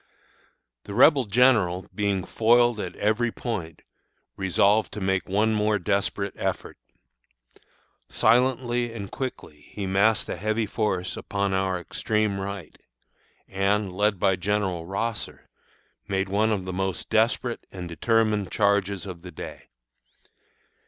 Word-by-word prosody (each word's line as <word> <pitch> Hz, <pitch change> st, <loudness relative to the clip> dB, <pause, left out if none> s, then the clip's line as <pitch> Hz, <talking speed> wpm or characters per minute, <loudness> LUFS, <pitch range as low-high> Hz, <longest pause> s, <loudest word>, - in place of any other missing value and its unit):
"The 100 Hz, -, -7 dB
Rebel 135 Hz, +1 st, +6 dB
general, 105 Hz, -5 st, +3 dB
being 100 Hz, -3 st, -1 dB
foiled 120 Hz, 0 st, +3 dB
at 90 Hz, -3 st, -5 dB
every 110 Hz, +3 st, +1 dB
point, 95 Hz, -12 st, -5 dB, 0.5 s
resolved 100 Hz, +3 st, +2 dB
to 105 Hz, -, -5 dB
make 95 Hz, -1 st, -1 dB
one 105 Hz, +3 st, +2 dB
more 105 Hz, 0 st, +2 dB
desperate 100 Hz, +1 st, -1 dB
effort. -, -, -3 dB, 1.3 s
Silently 120 Hz, 0 st, +2 dB
and 100 Hz, -4 st, -7 dB
quickly 125 Hz, -, -6 dB
he 100 Hz, -, -5 dB
massed 100 Hz, +3 st, +2 dB
a -, -, -4 dB
heavy 110 Hz, +4 st, 0 dB
force 100 Hz, -4 st, -2 dB
upon 100 Hz, -1 st, -2 dB
our 95 Hz, -1 st, 0 dB
extreme 105 Hz, +3 st, -1 dB
right, 95 Hz, -4 st, -6 dB, 0.7 s
and, 100 Hz, 0 st, 0 dB
led 105 Hz, +1 st, +1 dB
by 95 Hz, 0 st, +2 dB
General 95 Hz, -3 st, -1 dB
Rosser, 105 Hz, +4 st, -4 dB, 0.6 s
made 95 Hz, -1 st, -1 dB
one 105 Hz, +3 st, +2 dB
of 95 Hz, -4 st, -1 dB
the 95 Hz, -, -4 dB
most 95 Hz, 0 st, -3 dB
desperate 115 Hz, +2 st, +1 dB
and 90 Hz, -2 st, -7 dB
determined 105 Hz, +3 st, +1 dB
charges 100 Hz, -2 st, +1 dB
of 90 Hz, -4 st, -8 dB
the 90 Hz, -, -9 dB
day. 90 Hz, -, -9 dB
100 Hz, 125 wpm, -25 LUFS, 95-110 Hz, 1.3 s, Rebel